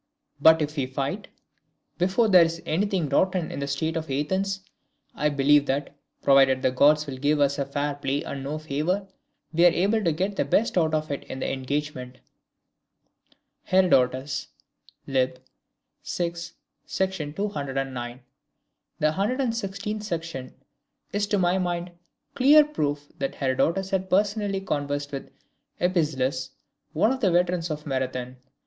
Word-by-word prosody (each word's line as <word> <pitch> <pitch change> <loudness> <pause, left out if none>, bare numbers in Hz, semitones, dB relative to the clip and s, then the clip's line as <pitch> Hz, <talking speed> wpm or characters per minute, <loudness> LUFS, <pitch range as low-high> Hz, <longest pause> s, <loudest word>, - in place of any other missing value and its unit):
But 160 +1 +7
if 150 +1 -5
we 135 -2 0
fight, 140 +10 -3 0.7
before 190 +6 +3
there 185 -4 +7
is 165 0 -2
anything 185 0 0
rotten 185 +4 +1
in - - -5
the 140 - -3
state 160 +4 -1
of 160 -2 -3
Athens, 190 +8 -1 0.5
I 150 - +1
believe 145 0 +4
that, 140 +1 -1 0.3
provided 135 -1 +5
the - - +3
Gods 150 +4 +4
will 135 -3 -7
give 145 +2 +2 0.3
fair 145 +1 -1
play 140 +1 -2
and 140 -4 -5
no 145 +3 -3
favour, 155 +6 -2 0.5
we 170 +2 +3
are 175 - +9
able 200 +6 +1
to 170 - +2
get 190 +6 -2
the - - +2
best 230 - +1
of 155 -3 +1
it 140 - -3
in - - -7
the - - -2
engagement." 130 -1 -4 1.5
[Herodotus, 135 -7 +2 0.6
lib. 130 -1 +1
vi. 170 +5 -7 0.6
sec. 190 0 0 0.3
209. 135 -7 -4 0.8
The 155 0 +2
116th 210 - -2
section 165 -9 -5 0.6
is 205 0 0
to 205 - +1
my 180 0 +2
mind 175 -1 -2 0.4
clear 290 +3 +6
proof 145 - -2
that 135 - -2
Herodotus 165 +8 0
had 190 -1 -1
personally 200 0 +1
conversed 145 -4 -2
with 135 -1 -6 0.5
Epizelus, 140 -7 0 0.4
one 215 +9 +2
of 265 - -2
the 205 -7 +3
veterans 175 -1 +1
of 150 -1 -5
Marathon. 130 -2 -3
155 Hz, 140 wpm, -25 LUFS, 140-190 Hz, 1.5 s, are